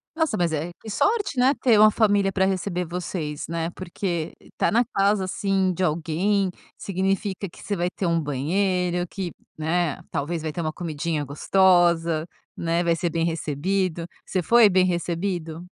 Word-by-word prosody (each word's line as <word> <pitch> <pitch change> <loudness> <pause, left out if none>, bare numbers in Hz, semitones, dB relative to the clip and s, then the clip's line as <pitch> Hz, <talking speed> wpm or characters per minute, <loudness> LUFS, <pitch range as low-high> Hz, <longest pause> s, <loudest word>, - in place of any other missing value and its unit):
Nossa, 320 -8 +1
mas 170 -2 +1
é 160 +3 -2
que 220 - -9
sorte, 410 - 0
né, 265 +3 +5
ter 230 -5 +5
uma 215 0 +8
família 205 -3 +2
para 190 -1 +2
receber 185 -1 -1
vocês, 170 -3 -4
né? 165 0 -2
Porque 175 -3 -4
estar - - -2
na 235 +2 +4
casa, 195 0 +2
assim, 190 0 0
de 185 - -2
alguém 180 +4 +1 0.3
significa 195 +1 -2
que - - -15
você 205 - -2
vai 175 -1 0
ter 185 - -4
um 170 -1 +2
banheiro 175 +5 0
que, 180 -3 -5 0.3
né, 160 -1 -1
talvez 160 +3 -2
vai 155 -1 -3
ter 170 - -4
uma 155 -1 -2
comidinha 160 -2 -3
gostosa, 170 +1 +3 0.3
né? 170 +1 0
Vai 170 -1 +2
ser 170 0 -1
bem 165 0 0
recebido. 170 +2 -1 0.2
Você 185 - -1
foi 230 +4 +6
bem 185 -1 +4
recebido? 175 -1 -2
175 Hz, 170 wpm, -24 LUFS, 165-195 Hz, 0.3 s, uma